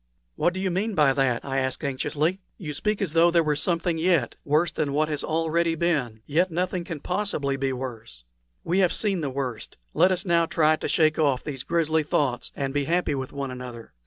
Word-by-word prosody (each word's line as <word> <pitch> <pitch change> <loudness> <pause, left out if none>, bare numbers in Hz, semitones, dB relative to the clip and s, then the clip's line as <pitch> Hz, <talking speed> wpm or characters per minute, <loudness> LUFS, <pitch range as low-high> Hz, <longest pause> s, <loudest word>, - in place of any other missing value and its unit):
"What 175 - +1
do - - -3
you 190 -1 0
mean 200 +4 -1
by 150 -5 +4
that?" 130 -3 0
I 135 -1 -1
asked, 130 +3 -2
anxiously. 150 +6 -1 0.2
"You 150 -5 -5
speak 210 +7 -1
as 165 -6 -3
though 165 +1 +5
there 170 -1 +3
were 150 -1 +1
something 170 +2 0
yet 165 -8 +2
worse 155 +3 +2
than 145 -4 -2
what 155 +2 +1
has 150 -2 -2
already 165 +1 +1
been; 140 -10 -1
yet 170 +6 +2
nothing 180 +1 -1
can 165 -5 -6
possibly 180 -8 -1
be 135 0 -1
worse. 115 - -7 0.4
We 180 +3 +1
have 180 -3 +3
seen 195 -5 +1
the 145 - -2
worst; 130 -4 -5 0.2
let 185 - +4
us 185 +1 -1
now 170 -2 +3
try 155 -1 +3
to - - -4
shake 155 -1 +2
off 140 -5 +2
these 135 -4 -4
grisly 160 0 +1
thoughts, 140 -4 -1
and 135 -1 -3
be 145 -1 0
happy 170 -1 +1
with 130 -2 -4
one 140 -2 -4
another. 125 -2 -9
155 Hz, 215 wpm, -25 LUFS, 135-170 Hz, 0.4 s, though